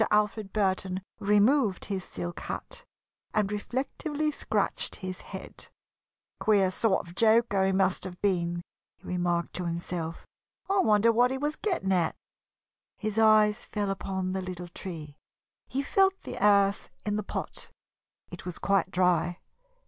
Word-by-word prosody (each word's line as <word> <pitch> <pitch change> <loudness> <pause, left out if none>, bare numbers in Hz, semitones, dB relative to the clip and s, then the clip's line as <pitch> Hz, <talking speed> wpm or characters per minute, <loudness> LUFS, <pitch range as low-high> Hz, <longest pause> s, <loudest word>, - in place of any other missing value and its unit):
Alfred 210 -1 +1
Burton 190 -2 0 0.2
removed 210 +1 +3
his 195 -2 -3
silk 85 - -6
hat - - -6 0.5
and 210 -2 +2
reflectively 280 +7 -2
scratched - - 0
his 185 -1 -6
head. - - -9 0.7
"Queer 200 -3 +3
sort 195 -2 +1
of 170 - -11
joker 220 -2 +4
he - - +2
must 190 -1 +1
have 180 -1 -7
been," 175 -3 0 0.3
he - - -16
remarked 175 -1 0
to 180 - -3
himself. 170 -1 -4 0.4
"I 390 0 +2
wonder 215 - +5
what 245 +2 +4
he 265 - -2
was 295 +3 -1
getting 355 - -1
at?" 175 -4 +2 0.8
His 215 0 -2
eyes 215 0 +5
fell 205 -2 -2
upon 190 -1 -2
the 190 0 -2
little 180 -1 -6
tree. 160 -5 -8 0.5
He 275 +2 -2
felt 385 +5 +3
the - - -5
earth 200 -1 +4 0.2
in 205 0 0
the 210 - 0
pot 200 - -5 0.6
it - - -8
was 180 -2 -5
quite 195 -1 +2
dry. 180 -1 +2
195 Hz, 145 wpm, -28 LUFS, 180-215 Hz, 0.8 s, wonder